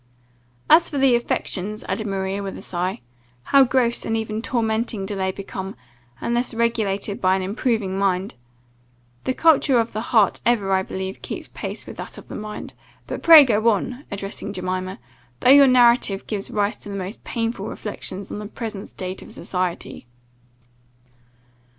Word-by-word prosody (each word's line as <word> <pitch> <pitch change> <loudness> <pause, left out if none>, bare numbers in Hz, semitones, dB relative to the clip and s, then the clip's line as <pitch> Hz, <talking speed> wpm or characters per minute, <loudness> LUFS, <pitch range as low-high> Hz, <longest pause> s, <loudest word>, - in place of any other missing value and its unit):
"And - - +9
as 335 - -2
for 290 - -4
the 270 -2 +4
affections," 215 -3 -1
added 220 -2 -2
Maria, 195 0 -2
with 195 -1 -5
a - - -9
sigh, 180 -3 -2 0.4
"how 275 - +6
gross, 245 -2 +1
and 225 0 -1
even 220 0 -3
tormenting 225 -3 -1
do 205 +1 -3
they 190 -1 0
become, 190 0 -6 0.4
unless 240 0 -1
regulated 215 -3 -1
by 185 0 +4
an 190 - -2
improving 205 -1 -1
mind! 190 -1 0 0.9
The 260 - 0
culture 295 -5 +4
of 230 0 -1
the 215 - -2
heart 220 -3 +2
ever, 210 -5 +2
I 190 - +3
believe, 190 0 -5
keeps - - -6
pace - - -6
with - - -10
that - - -7
of - - -12
the - - -6
mind. 210 0 -7 0.3
But - - -5
pray 325 -3 +10
go 225 -1 +3
on," 245 +6 -2
addressing 200 0 -5
Jemima, 185 0 -3 0.4
"though 255 - +6
your 280 0 +9
narrative 240 -5 +4
gives 205 -2 -4
rise 205 +1 0
to - - -11
the 200 - -5
most 195 +2 -6
painful 230 -3 -3
reflections 200 -2 -6
on - - -4
the 210 - -6
present 215 -2 -6
state 185 0 -6
of - - -12
society." 180 -8 -4
210 Hz, 170 wpm, -22 LUFS, 195-235 Hz, 0.9 s, pray